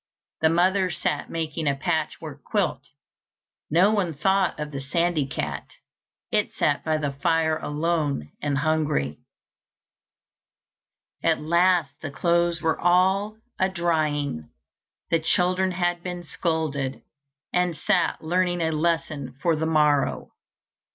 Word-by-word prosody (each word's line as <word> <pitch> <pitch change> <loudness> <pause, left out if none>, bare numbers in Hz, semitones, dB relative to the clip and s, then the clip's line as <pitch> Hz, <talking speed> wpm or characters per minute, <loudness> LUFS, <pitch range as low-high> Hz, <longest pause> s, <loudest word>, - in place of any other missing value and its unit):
The 160 - +4
mother 185 +3 +2
sat 150 -3 -2
making 160 -1 -3
a 140 - +2
patchwork 155 -1 -3
quilt. 205 -5 -1 0.8
No 180 +7 +4
one 185 -7 0
thought 190 +4 +1
of 150 0 -4
the 140 - -4
sandy 160 +1 0
cat; - - -4 0.6
it - - +2
sat - - +1
by 155 -1 +1
the 145 -2 -2
fire 160 +2 +1
alone 150 - -1
and 145 -2 0
hungry. 150 - 0 2.0
At - - +2
last 170 -1 +2
the 150 - -4
clothes 170 +2 +1
were 160 0 +1
all 190 +4 +2 0.2
a 190 -1 +3
drying, 155 - -1 0.6
the 165 - +4
children 180 +3 +2
had 175 -1 -1
been 180 -1 -5
scolded, 150 -4 -2 0.5
and 180 -2 +1
sat 165 +3 +1
learning 175 +1 +1
a 160 -1 +1
lesson 155 -4 -1
for 165 +3 +2
the 160 +1 -1
morrow. 150 -3 +2
160 Hz, 125 wpm, -25 LUFS, 150-175 Hz, 2.0 s, The